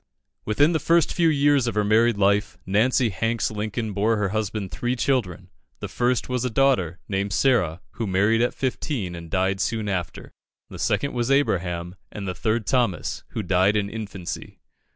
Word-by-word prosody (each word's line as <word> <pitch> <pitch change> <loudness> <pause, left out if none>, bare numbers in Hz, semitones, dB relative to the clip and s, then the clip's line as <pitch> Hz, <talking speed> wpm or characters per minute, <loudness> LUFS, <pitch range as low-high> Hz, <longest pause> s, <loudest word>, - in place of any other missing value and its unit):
Within 145 +9 +3
the 160 - +1
first 170 0 +2
few 170 -2 +3
years 145 -3 +3
of 120 - -2
her 105 - +2
married 110 +2 +3
life, 100 +1 +1
Nancy 115 +5 +2
Hanks 115 +3 -1
Lincoln 110 +1 -3
bore 110 +3 +1
her 105 -2 0
husband 105 -1 -3
three 120 +1 -2
children. 100 -9 -1 0.3
The - - -5
first 125 0 0
was 125 -1 -1
a 125 - 0
daughter, 115 - +2
named 100 0 -2
Sarah, 95 - +2
who 115 -1 -4
married 105 +4 +2
at 120 - 0
fifteen, 130 - -2
and 85 -1 -8
died 95 +2 0
soon 110 0 -1
after; 90 -4 -4 0.4
the - - -9
second 140 - 0
was 120 0 -1
Abraham; 90 -11 0 0.2
and 100 -2 -6
the 90 - -2
third 110 +2 -1
Thomas, 115 -7 0
who 110 - -5
died 95 +3 +3
in 100 -1 -1
infancy. 100 -5 -7
110 Hz, 175 wpm, -24 LUFS, 95-125 Hz, 0.4 s, Within